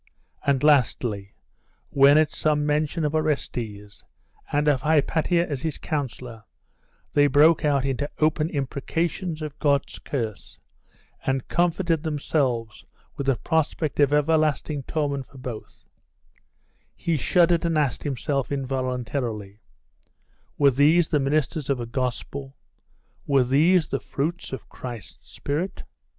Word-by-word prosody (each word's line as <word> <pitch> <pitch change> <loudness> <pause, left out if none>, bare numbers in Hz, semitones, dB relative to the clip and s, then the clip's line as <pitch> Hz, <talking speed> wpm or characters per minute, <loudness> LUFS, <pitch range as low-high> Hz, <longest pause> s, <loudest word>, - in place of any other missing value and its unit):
and 140 -1 +2
lastly, 120 -8 +2 0.6
when 140 +1 +6
at 155 -1 +3
some 150 -1 0
mention 150 +2 0
of 150 - -1
Orestes, 115 -10 -3 0.5
and 145 +1 +1
of 140 -4 +3
Hypatia 160 +3 +2
as 140 -4 -4
his 160 -2 -3
counsellor, 125 -6 -5 0.7
they 145 0 +5
broke 150 +4 +5
out 140 -3 +2
into 140 +2 -2
open 155 0 +1
imprecations 155 +4 -2
of 150 -2 -7
God's 140 -1 +1
curse, 115 -7 -5 0.7
and 135 -1 -1
comforted 170 -1 +1
themselves 135 -7 -1 0.3
with 140 -2 -4
the 135 - +4
prospect 155 0 -1
of 145 -1 +4
everlasting 150 -1 +1
torment 140 -3 -2
for 140 - -16
both; 125 -4 -8 1.1
he 170 - -1
shuddered 170 +4 +3
and 165 -2 +1
asked 140 -6 0
himself 135 -2 -2
involuntarily 125 -6 -3 1.0
were 140 -1 +5
these 155 +6 +4
the 150 - +2
ministers 145 +1 0
of 135 -2 +1
a 120 - -3
Gospel? 130 +3 -4 0.7
were 140 -2 +4
these 155 +6 +3
the 135 - -1
fruits 165 +6 -3
of 130 - -7
Christ's 115 - -9
Spirit?.... 165 +7 -3
145 Hz, 125 wpm, -24 LUFS, 130-155 Hz, 1.1 s, when